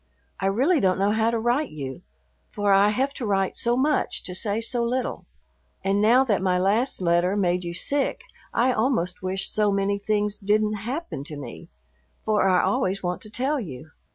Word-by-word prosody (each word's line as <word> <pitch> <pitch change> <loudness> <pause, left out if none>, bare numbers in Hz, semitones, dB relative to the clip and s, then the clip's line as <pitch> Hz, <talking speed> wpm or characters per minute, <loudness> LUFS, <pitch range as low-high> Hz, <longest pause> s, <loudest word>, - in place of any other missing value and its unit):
I 195 - 0
really 270 - +2
don't 185 -4 +2
know 200 +2 +2
how 220 +1 +2
to 230 - 0
write 240 +6 0
you, 135 -3 -7 0.5
for 205 -1 +1
I 200 +1 +5
have 265 +6 0
to 255 - -5
write 195 -2 0
so 240 +1 +1
much 295 +3 +1
to 180 - -6
say 205 +3 -1
so 235 +1 0
little, 250 +2 -2 0.6
and 195 +1 +1
now 240 +5 +5
that 215 -8 0
my 185 -1 +2
last 200 +4 +1
letter 175 +2 +2
made 180 -2 +1
you 170 0 -5
sick 285 - -1 0.3
I 250 +2 +2
almost 215 -8 0
wish 185 +1 -2
so 210 -1 +2
many 200 0 0
things 210 0 0
didn't 210 +1 +1 0.2
happen 290 - -4
to 150 -1 -7
me, 145 - -9 0.6
for 210 -3 +2
I 180 -1 +3
always 195 -7 0
want 180 0 -2
to 215 - -9
tell 270 +6 -1
you. 155 - -8
205 Hz, 190 wpm, -24 LUFS, 185-240 Hz, 0.6 s, I